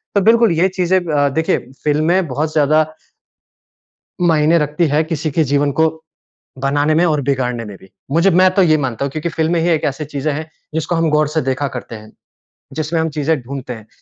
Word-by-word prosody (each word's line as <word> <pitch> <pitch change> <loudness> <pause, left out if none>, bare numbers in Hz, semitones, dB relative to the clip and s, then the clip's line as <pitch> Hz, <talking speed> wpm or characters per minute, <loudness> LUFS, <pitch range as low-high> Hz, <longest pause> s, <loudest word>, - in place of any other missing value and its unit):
तो 200 - +4
बिल्कुल 230 +1 +4
ये 170 +3 +3
चीज़ें 185 0 +1
अ, 150 -5 0
देखिए 160 +4 0 0.3
फ़िल्में 160 +5 +1
बहुत 150 +4 -2
ज़्यादा 155 0 +3 1.4
मायने 160 -1 +3
रखती 150 +3 0
है 150 +2 +2
किसी 155 -1 -3
के 160 +3 +2
जीवन 145 0 +1
को 160 - +5 0.8
बनाने 145 +2 +2
में 170 +3 +3
और 150 -4 +1
बिगाड़ने 125 -4 -1
में 105 -2 -9
भी। 95 - -18 0.2
मुझे 170 +5 +3
मैं 185 +2 +5
तो 195 - +5
ये 155 -3 +4
मानता 135 -2 -2
हूँ 140 - -4
क्योंकि 155 +3 -3
फ़िल्में 160 +1 0
ही 175 - +1
एक 160 -2 +1
ऐसी 145 +2 -2
चीज़ें 145 +1 -3
हैं 155 +2 -6 0.3
जिसको 160 +2 -1
हम 165 -1 +1
गौर 150 0 +2
से 155 +2 -1
देखा 135 +2 -1
करते 120 -1 -7
हैं। 110 0 -12 0.6
जिसमें 160 +1 -2
हम 160 - -1
चीज़ें 150 +1 +1
ढूँढते 130 0 -6
हैं। 110 -1 -12
155 Hz, 200 wpm, -17 LUFS, 140-165 Hz, 1.4 s, को